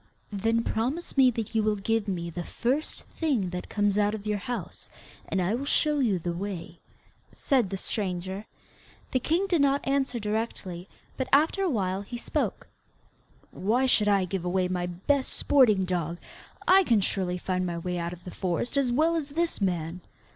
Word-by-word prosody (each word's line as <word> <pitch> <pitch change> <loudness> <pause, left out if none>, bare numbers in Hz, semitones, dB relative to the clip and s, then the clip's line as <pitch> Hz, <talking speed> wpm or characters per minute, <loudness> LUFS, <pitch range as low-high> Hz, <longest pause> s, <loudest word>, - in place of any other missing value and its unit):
'Then 225 +3 +1
promise 260 +12 -2
me 265 -2 +7
that 225 -2 -4
you 220 - +3
will 215 0 +2
give 215 +1 0
me 170 -3 -2
the 175 +1 -4
first 265 - -2
thing 255 - -1
that 180 0 -5
comes 205 -1 +1
out 210 +1 +2
of 210 -1 -8
your 210 -1 0
house, 245 +3 -6 0.4
and 195 - -1
I 185 +3 +1
will 250 +4 -1
show 295 +1 +2
you 225 -8 +2
the 175 0 -3
way,' 175 -2 -5 0.5
said 255 -8 +1
the 195 - -3
stranger. 190 0 -3 0.6
The 255 - +2
king 335 +9 +1
did 350 -6 +2
not 280 0 +2
answer 270 -2 +1
directly, 210 -5 -3 0.3
but 260 - -1
after 315 +7 +4
awhile 200 - 0
he 240 +4 -6
spoke: - - -2 0.8
'Why 230 +7 +1
should 215 -5 +3
I 200 -2 +4
give 185 0 -3
away 180 +1 +1
my 180 -1 -1
BEST 230 +11 0
sporting 215 -9 +4
dog. 175 -2 -2 0.5
I 385 +1 +7
can 230 - +3
surely 185 -2 -1
find 185 0 -1
my 170 -1 -3
way 180 +1 -3
out 170 0 -2
of 175 0 -10
the 180 - -7
forest 185 - -2
as 265 -3 +2
well 315 +6 +3
as 305 -3 -2
this 330 -3 -1
man. 175 -2 -1
210 Hz, 185 wpm, -27 LUFS, 185-260 Hz, 0.8 s, me